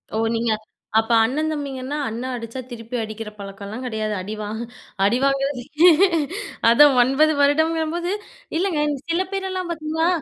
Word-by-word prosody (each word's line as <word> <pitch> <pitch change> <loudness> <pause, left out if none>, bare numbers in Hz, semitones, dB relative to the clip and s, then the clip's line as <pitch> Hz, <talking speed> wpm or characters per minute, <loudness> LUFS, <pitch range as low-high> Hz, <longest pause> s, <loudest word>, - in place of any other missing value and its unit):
ஓ - - 0 0.2
நீங்க 230 0 0 0.5
அப்ப 225 - -2
அண்ண 255 +6 0
தம்பிங்கன்னா 280 -2 -4
அண்ணன் 245 +4 -4
அடிச்சா, 230 +1 -6
திருப்பி 235 0 -7
அடிக்கிற 215 0 -6
பழக்கம்லாம் 200 +4 -7
கிடையாது. 215 -3 -2
அடிவாங்க 215 +3 -5 0.4
அடிவாங்குறது 275 +3 +1 1.1
அதான் 280 +4 +7
9 275 +5 +4
வருடங்கும்போது 320 +4 +1 0.4
இல்லங்க 335 -5 +1 0.2
சில 335 +2 +2
பேரெல்லாம் 375 -2 -3
பார்த்தீங்கன்னா 320 0 -1
265 Hz, 115 wpm, -22 LUFS, 225-310 Hz, 1.1 s, அதான்